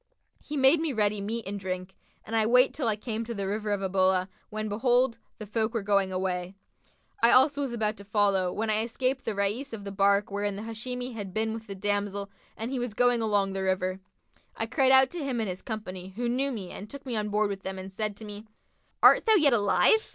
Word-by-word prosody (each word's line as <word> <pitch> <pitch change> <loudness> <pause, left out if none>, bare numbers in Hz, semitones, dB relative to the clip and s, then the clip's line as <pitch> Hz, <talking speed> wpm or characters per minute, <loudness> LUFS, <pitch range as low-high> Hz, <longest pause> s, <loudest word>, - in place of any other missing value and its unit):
He 295 - -5
made 270 +4 +5
me 320 -3 -1
ready 210 -2 +1
meat 225 +3 -4
and 200 +1 -4
drink 185 0 -5 0.3
and 225 - -4
I 220 -1 +3
went 250 +3 +5
till 275 -5 -2
I 215 - +2
came 220 +1 -4
to 230 0 -6
the 200 -1 -3
River 210 +2 -2
of 205 -1 0
Ubullah, 185 0 +2 0.2
when, 215 0 -4
behold, 240 +3 +1 0.2
the 215 - -7
folk 220 +2 -2
were 225 - -1
going 200 -1 +2
away: 185 0 -2 0.7
I 235 - +6
also 280 +3 +5
was 275 -3 -2
about 215 -2 -1
to 200 - -10
follow, 200 -3 +1
when 220 +3 -1
I 215 0 +2
espied 255 +3 -1
the 225 -5 -4
Rais 210 +7 -1
of 210 -3 -6
the 200 - -6
bark 200 +1 +2
wherein 205 0 -2
the 205 - -6
Hashimi 245 +3 -5
had 200 -4 -7
been 220 0 0
with 225 0 -8
the 200 - -6
damsel 200 0 -2 0.3
and 225 +3 -4
he 265 - -2
was 240 -3 -4
going 245 -1 +3
along 205 -3 +1
the 195 - -3
river. 185 0 -1 0.6
I - - 0
cried 265 -4 +2
out 265 0 +6
to 345 -4 -4
him 260 -4 -2
and 220 - -1
his 185 0 -5
company 190 -4 -6
who 240 +2 -2
knew 265 +3 0
me 200 -7 -6
and 205 - -8
took 280 +2 -10
me 250 -3 -3
on 210 -1 -1
board 210 0 +1
with 195 -1 -5
them 190 0 -5
and 190 +1 -8
said 210 0 -3
to 220 - -9
me, 210 +1 -9 0.6
'Art - - +7
thou 440 - +6
yet 300 -9 +5
alive?' 210 - +3
215 Hz, 240 wpm, -28 LUFS, 200-240 Hz, 0.7 s, Art